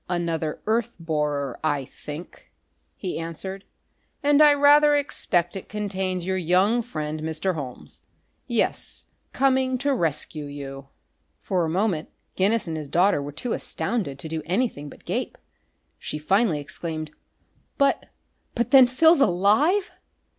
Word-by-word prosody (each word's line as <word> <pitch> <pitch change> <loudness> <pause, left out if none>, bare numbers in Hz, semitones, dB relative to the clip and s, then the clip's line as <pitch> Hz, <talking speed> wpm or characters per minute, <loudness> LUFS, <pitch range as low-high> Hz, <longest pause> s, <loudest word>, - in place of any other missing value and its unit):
"Another 165 -3 -2
earth 230 +2 0
borer, 150 -5 -2
I 145 -3 0
think," 150 +6 -10 0.4
he 185 -4 -4
answered. 190 +4 -6 0.6
"And 290 +1 +5
I 300 -1 +8
rather 290 +1 +6
expect 180 -11 0
it 195 - -7
contains 190 -4 -2
your 190 0 0
young 185 +7 +3
friend 155 -9 -4
Mr. 160 +4 -1
Holmes. 135 -6 -7 0.5
Yes 235 -3 -1 0.3
coming 260 -1 +2
to 280 +2 0
rescue 155 - -2
you." 135 -1 -8 0.5
For 180 -3 0
a - - -2
moment 180 -2 0 0.3
Guinness 205 +2 +2
and 160 -1 -3
his 150 -3 -6
daughter 180 -1 +3
were 145 +1 -6
too 225 - -4
astounded 190 - -2
to 150 - -7
do 160 0 -3
anything 175 - -1
but - - -15
gape. - - -3 0.6
She - - -4
finally 190 +2 +2
exclaimed: 155 +1 -4 0.7
"But 280 0 +2 0.5
but 240 0 -1
then 265 -2 +8
Phil's 320 +5 +5
alive?" 220 - +3
180 Hz, 135 wpm, -24 LUFS, 155-235 Hz, 0.7 s, I